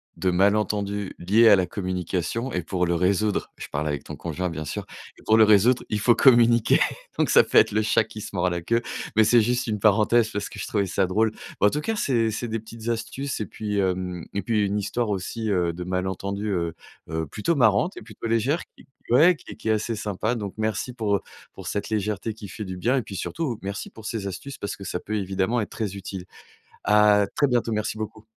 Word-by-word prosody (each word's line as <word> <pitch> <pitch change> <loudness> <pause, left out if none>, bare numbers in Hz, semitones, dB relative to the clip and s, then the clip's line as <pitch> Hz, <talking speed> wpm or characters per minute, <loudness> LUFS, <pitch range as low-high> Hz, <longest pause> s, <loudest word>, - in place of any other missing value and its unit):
de 95 - 0
malentendus 100 +1 +1
liés 110 +6 +5
à 100 - +9
la 90 -1 +1
communication 95 +6 -3
et 90 - 0
pour 90 +1 -1
le 85 - 0
résoudre, 100 +4 +1
je - - -7
parle 75 +1 -2
avec 70 -2 -2
ton - - -8
conjoint, 85 +2 -3
bien 80 -1 -5
sûr, 70 - -5 0.4
pour 110 +1 +5
le 110 - +8
résoudre, 110 +4 +5
il 105 - -1
faut 120 +3 +5
communiquer. 120 -3 +5 0.4
Donc - - +2
ça - - +7
peut - - +1
être - - +6
le 110 +1 +2
chat 110 +1 +3
qui 105 0 -10
se 100 - -8
mord 90 0 +1
la 85 -1 -2
queue, 115 +6 0 0.3
mais 110 - +6
c'est 115 +2 +5
juste 125 +2 0
une 105 -3 -2
parenthèse 110 +2 +4
parce 105 - -4
que - - -10
je - - -4
trouvais 100 -2 0
ça 95 0 0
drôle. 110 +4 +2 0.3
Bah, - - +4
en - - +5
tout 150 - -1
cas, 225 +7 -2
c'est 115 - +1
c'est 115 +3 -3
des 115 0 -2
petites 115 +1 -8
astuces 125 +4 -3
et 105 - -3
puis, 105 -2 -3
hem 90 -2 -1
et 100 - -1
puis 105 -1 +1
une 100 +1 -1
histoire 105 +3 -1
aussi, 105 +3 -3
heu, 90 -3 +1
de 90 +1 -6
malentendus, 95 +3 -3
heu 85 -4 -1 0.3
heu, 80 0 -2
plutôt 110 - -1
marrante 120 - +3
et - - -8
plutôt 110 +1 -7
légère 120 +9 +1 0.2
qui - - -17 0.2
ouais, 165 +9 +6
qui - - -13
est - - -8
qui 110 - -4
est - - +5
assez 110 +1 0
sympa. 105 +3 -2
Donc 100 -4 -5
merci 110 +3 -2
pour, 105 -4 0
heu, - - -1 0.3
pour - - -11
cette 100 - -3
légèreté 105 +1 -2
qui 105 -2 -9
fait 105 +2 -6
du 95 -1 -6
bien 125 +8 +1
et - - +1
puis 100 - -9
surtout, 130 - -3
merci 100 +1 -5
pour 110 -1 -13
ces 105 -4 -3
astuces, 135 +9 -7
parce 100 - -4
que 100 - -11
ça 90 - -3
peut 110 - -4
évidemment 95 +4 0
être 105 - -3
très 100 -3 -3
utile. 95 -1 -7 0.6
À 105 -1 +5
très 145 - +3
bientôt. 120 -3 +1
Merci 105 0 -2
beaucoup. 110 0 -6
105 Hz, 235 wpm, -25 LUFS, 95-115 Hz, 0.6 s, à